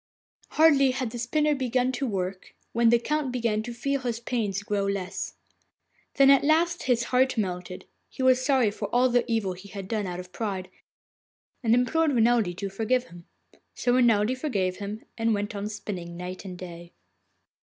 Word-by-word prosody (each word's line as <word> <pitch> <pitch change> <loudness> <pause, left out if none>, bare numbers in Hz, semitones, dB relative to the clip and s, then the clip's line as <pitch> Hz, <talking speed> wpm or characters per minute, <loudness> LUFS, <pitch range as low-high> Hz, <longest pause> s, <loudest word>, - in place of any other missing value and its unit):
Hardly 290 -4 +5
had 255 -2 -2
the 240 - -6
spinner 300 +6 +1
begun 255 -2 0
to 260 +1 -2
work 190 -3 -4 0.2
when 235 0 +4
the 235 - +6
Count 290 +2 -1
began 230 -4 0
to 240 +2 -6
feel 275 +4 -1
his 240 -2 -2
pains 215 -5 -2
grow 205 -1 -1
less. 190 -1 -3 0.8
Then 275 0 +7
at 275 - +5
last 335 +3 +2
his 240 -1 +3
heart 260 0 +3
melted; 180 -3 -3 0.2
he 260 - -5
was 255 0 +4
sorry 260 -6 +3
for 205 0 -4
all 245 +4 +3
the 245 0 +3
evil 210 -5 0
he 185 +3 -12
had 195 -1 -7
done 210 -2 -2
out 180 0 -5
of 180 0 -9
pride, 190 -4 -4 0.9
and 230 -2 +3
implored 295 +5 +2
Renelde 225 -6 +2
to 200 - -3
forgive 230 +6 -1
him. 170 0 -14 0.5
So 245 - +1
Renelde 240 -1 +3
forgave 200 -10 -1
him, 205 +2 -6 0.2
and 225 -1 +2
went 205 +2 -3
on 205 0 -4
spinning 180 -5 -6
night 180 +2 -7
and 185 -2 -7
day. 175 -1 -10
225 Hz, 180 wpm, -26 LUFS, 195-255 Hz, 0.9 s, Then